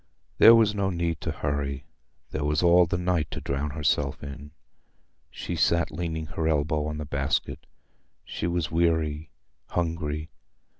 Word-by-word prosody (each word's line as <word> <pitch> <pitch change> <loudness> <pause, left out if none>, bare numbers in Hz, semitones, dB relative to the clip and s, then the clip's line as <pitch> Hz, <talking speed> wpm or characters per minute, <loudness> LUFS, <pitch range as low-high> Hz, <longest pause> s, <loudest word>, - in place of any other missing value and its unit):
There 115 - +10
was 110 -2 +4
no 100 -2 0
need 85 -3 -2
to - - -3
hurry—there 70 -3 -5
was 75 +2 +1
all 85 0 +6
the 90 +2 -1
night 90 -3 0
to - - -5
drown 70 +2 -2
herself 70 -2 -1
in. 70 +1 -8 0.8
She 85 - -5
sat 85 +1 +2
leaning 80 -2 -3
her 80 +1 -3
elbow 75 0 +1
on 75 0 -4
the 75 - -5
basket. 70 -1 -2 0.6
She - - -3
was 85 -2 -1
weary, 80 -2 0 0.4
hungry. 80 -3 -3
80 Hz, 145 wpm, -26 LUFS, 75-85 Hz, 0.8 s, There